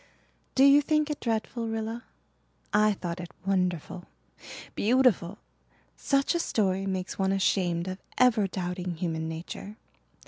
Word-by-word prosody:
"Do 265 - +5
you 280 +1 +7
think 305 0 +1
it 295 - -4
dreadful, 230 0 -2
Rilla? 225 +1 -4 0.7
I 210 0 +4
thought 175 -2 -5
it 175 -1 -6 0.2
wonderful 180 -2 -1 0.7
beautiful. 220 -5 +2 0.6
Such 275 +2 +1
a 340 - 0
story 195 - 0
makes 185 0 -3
one 190 0 +2
ashamed 180 -3 +1
of 185 +1 -5 0.2
ever 235 -5 +4
doubting 180 -1 -4
human 160 -2 -3
nature. 170 +5 -7
195 Hz, 130 wpm, -28 LUFS, 180-230 Hz, 0.7 s, you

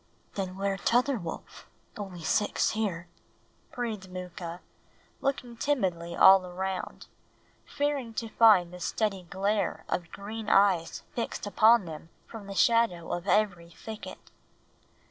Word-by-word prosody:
"Then 190 -2 -4
where 195 0 -1
tother 245 +4 +2
wolf? 170 -3 -8 0.3
Only 190 -5 -7
six 210 +6 +1
here," 190 -6 -2 0.6
breathed 220 -6 -4
Mooka, 180 -1 -7 0.6
looking 255 -3 -2
timidly 185 -11 -1
all 190 0 +8
around, 185 +1 -5 0.6
fearing 280 -6 -2
to 225 0 -3
find 200 -7 +5
the 180 - -9
steady 195 +2 -1
glare 200 +3 -1
of 170 -2 -3
green 215 +2 -6
eyes 190 -5 +3
fixed 230 - -3
upon 220 +1 +5
them 160 0 -9 0.2
from 220 -3 -10
the 195 - -7
shadow 225 -4 +2
of 175 +3 -4
every 195 -5 +1
thicket. 215 +5 -10
195 Hz, 125 wpm, -28 LUFS, 180-225 Hz, 0.6 s, all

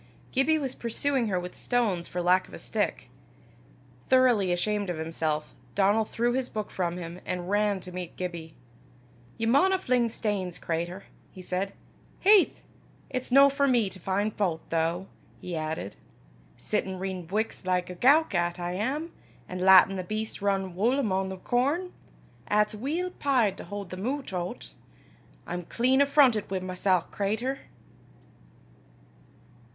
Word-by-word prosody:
Gibbie 290 +4 +3
was 270 -4 -2
pursuing 245 +1 -1
her 185 -3 0
with 180 0 -7
stones 215 -9 0
for 180 0 -3
lack 185 +1 +3
of - - -11
a - - -7
stick. - - -2 1.0
Thoroughly 245 -8 +4
ashamed 205 +2 0
of 175 - -2
himself, 160 -1 -2 0.2
Donal 205 +3 +3
threw 240 +3 0
his 260 0 -1
book 215 -1 -4
from 175 -1 -2
him, 170 0 -7
and 180 +1 -4
ran 205 -1 +2
to 180 - -9
meet 180 -1 -6
Gibbie. 170 -3 -5 0.8
"Ye 225 - -1
maunna 365 +11 +4
fling 250 -9 +1
stanes, 200 -6 -2
cratur," 170 +3 -3 0.3
he 185 - -11
said. 190 +2 -2 0.5
"Haith! 400 -1 +5 0.5
it's 255 -1 -3
no 275 +2 +8
for 280 0 +1
me 235 -7 +2
to 185 - -11
fin' 200 +4 0
fau't, 180 -6 -2
though," 165 +3 0 0.3
he 180 -1 -5
added, 155 -9 -4 0.6
"sittin' 190 -3 -2
readin' 185 -2 -4
buiks 215 +4 -2
like 180 -1 0
a - - -7
gowk 280 - +4
'at 175 0 0
I 175 0 -3
am, 270 - -2 0.3
an' 180 - -5
lattin' 190 +1 +7
the 185 - -3
beasts 215 +3 -4
rin 195 -2 0
wull 235 +8 +2
amo' 195 -7 0
the 190 - -6
corn, 280 - 0 0.5
'at's 210 +1 +2
weel 310 +12 -2
peyed 245 -9 +2
to - - -8
haud 205 -2 -7
them 185 +4 -4
oot 275 -5 -3
o' 180 -1 -2
't! - - -13 0.7
I'm 175 0 -4
clean 255 +7 +2
affrontit 280 -6 +4
wi' 190 - -1
mysel', 185 0 +1
cratur." 220 +7 -2
200 Hz, 155 wpm, -28 LUFS, 180-245 Hz, 1.0 s, no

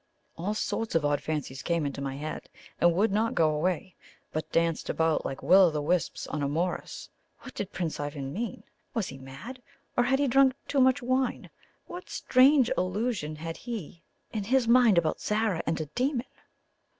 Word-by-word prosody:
All 195 +6 -2
sorts 225 -1 -2
of 160 -3 +2
odd 145 -1 +1
fancies 145 -4 -4
came 170 -3 0
into 140 0 -4
my 135 -1 -3
head, 155 +2 -6 0.3
and 175 - +5
would 205 +4 +2
not 220 +3 +1
go 155 -2 +4
away, 175 +4 -1 0.4
but 155 - -4
danced 165 -1 0
about 160 -1 +1
like 135 - -5
Will 185 +5 +7
o' - - +2
the 150 -1 -2
wisps 170 +3 -1
on 150 - -4
a 140 - +1
morass. 170 +5 -3 0.3
What 260 - -10
did 200 - -5
Prince 170 -4 -3
Ivan 145 -2 -4
mean? 225 0 -4 0.3
Was 225 -5 -1
he 135 - -9
mad? 135 - -9 0.3
or 245 - +3
had 265 +2 +3
he 285 0 +1
drunk 265 0 +4
too 280 - +1
much 260 0 +4
wine? 255 0 -1 0.3
What 355 +1 -9
strange 260 0 +4
illusion 185 -3 -1
had 165 +1 -6
he 210 -9 -7 0.3
in 210 -3 -2
his 255 +1 +2
mind 235 -5 +6
about 160 -2 +1
Zara 210 -5 0
and 160 - 0
a 155 - -2
demon? 250 - -1
185 Hz, 185 wpm, -28 LUFS, 155-240 Hz, 0.4 s, Will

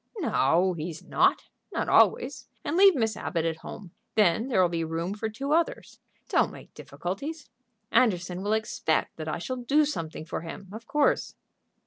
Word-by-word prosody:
"No, 180 - +2
he's 160 0 -6
not; - - +2 0.3
not - - -2
always. - - +3 0.2
And 305 - -2
leave 390 0 +7
Miss 225 -4 0
Abbott 165 -2 -2
at 165 -1 -1
home. 185 +2 -9 0.2
Then 215 +2 +3
there'll 190 -9 +3
be 170 -1 -2
room 165 +3 -2
for 220 +1 -3
two 275 +7 -2
others. 335 +1 -1 0.3
Don't - - +2
make - - -13
difficulties. 280 - -6 0.4
Anderson 185 -7 +2
will 205 +2 0
expect 220 -7 0
that 155 -1 -6
I 155 - -2
shall 255 +9 -4
do 280 +5 +3
something 160 - -4
for 165 - -4
him, 175 +3 -8
of 225 +1 -9
course." 295 -1 +1
200 Hz, 165 wpm, -27 LUFS, 170-255 Hz, 0.4 s, leave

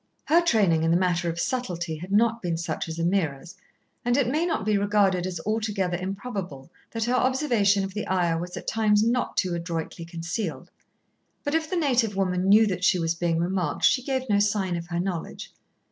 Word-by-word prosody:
Her 335 +3 +4
training 205 - +3
in 165 - +1
the 170 - +4
matter 175 -1 +1
of 165 0 -4
subtlety 175 -9 -2
had 180 +5 -9
not 230 +2 +3
been 170 -3 -2
such 165 0 -4
as 160 - -5
Ameerah's, 170 -1 -1 0.5
and 245 +1 +1
it 270 -4 +2
may 320 +5 +1
not 320 - -1
be 215 -1 +2
regarded 200 -3 +2
as 180 -3 -4
altogether 210 -4 -1
improbable 185 - -5 0.2
that 225 -1 -3
her 240 +3 0
observation 245 -7 +2
of 195 0 -5
the 210 +1 -4
Ayah 175 -3 +1
was 175 +1 -6
at - - -7
times 215 -1 +2
not 240 +2 0
too 185 -2 +1
adroitly 170 -1 -4
concealed, 170 +5 -5 0.7
but 290 - -2
if 320 -1 0
the 370 - -2
native 250 - +1
woman 185 -1 0
knew 215 +2 +7
that 185 -3 -2
she 185 - +4
was 165 -1 0
being 170 -1 -1
remarked, 175 -2 -1
she 255 - +4
gave 260 0 -2
no 205 -2 +3
sign 205 -3 +1
of 170 0 -5
her 170 -1 -2
knowledge. 180 -2 -4
195 Hz, 200 wpm, -25 LUFS, 175-225 Hz, 0.7 s, knew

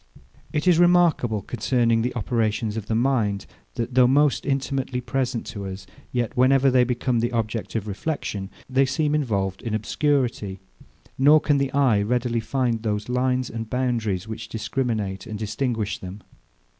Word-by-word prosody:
It 150 +4 -1
is 175 -2 +5
remarkable 170 - +3
concerning 115 0 +1
the 125 - -2
operations 110 -1 -1
of 110 -2 -5
the 110 - 0
mind, 115 -5 +1 0.3
that, 120 +2 -3
though 125 -1 +6
most 145 +3 +2
intimately 135 -2 -1
present 125 -1 -2
to 100 -2 -5
us, 95 0 -7 0.3
yet, 120 -3 -1
whenever 135 +1 +4
they 125 -1 +5
become 125 0 0
the 120 +2 0
object 115 -1 -3
of 110 -2 -2
reflexion, 100 -3 -3 0.2
they 130 +1 +2
seem 145 +2 0
involved 100 -10 -1
in 115 -2 -2
obscurity; 115 -4 0 0.6
nor 145 +3 +7
can 145 -2 +1
the 140 -1 0
eye 130 -7 +3
readily 120 +2 0
find 120 0 -1
those 105 0 -2
lines 125 0 +1
and 115 -1 -6
boundaries, 115 -6 -1
which 110 0 -7
discriminate 110 -4 -2
and 110 -2 -5
distinguish 110 0 -2
them. 95 +2 -9
120 Hz, 155 wpm, -24 LUFS, 110-135 Hz, 0.6 s, nor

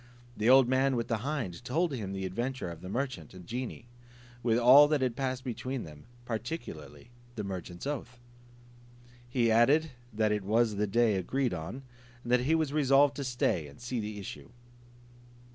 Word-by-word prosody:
The 110 +1 +1
old 130 -1 +7
man 130 +1 +2
with 115 -1 -2
the 115 - +1
hind 120 - -4
told 155 +6 0
him 105 -7 -4
the 95 -1 -4
adventure 120 +1 -3
of 85 -1 -10
the 90 - -8
merchant 115 - -4
and 90 -1 -11
genie, 120 +2 -5 0.5
with 115 -1 +2
all 130 +5 +8
that 150 -2 +1
had 125 -3 0
passed 130 0 -2
between 130 0 -4
them, 75 -2 -12 0.2
particularly 120 +1 -6 0.2
the 105 - -4
merchant's 90 -1 -6
oath. 130 -3 -5 1.1
He 120 -3 +2
added, 140 +8 +4 0.2
that 110 0 +1
it 105 -1 0
was 110 +1 +2
the 105 +1 +1
day 110 0 +2
agreed 130 +6 -1
on, 90 +11 -6 0.4
and 120 - -5
that 125 - +5
he 160 - +5
was 155 -3 0
resolved 140 -1 +4
to 140 - -3
stay 120 - 0
and 70 - -15
see 120 0 -3
the 105 -1 -5
issue. 75 -8 -8
120 Hz, 180 wpm, -30 LUFS, 105-135 Hz, 1.1 s, all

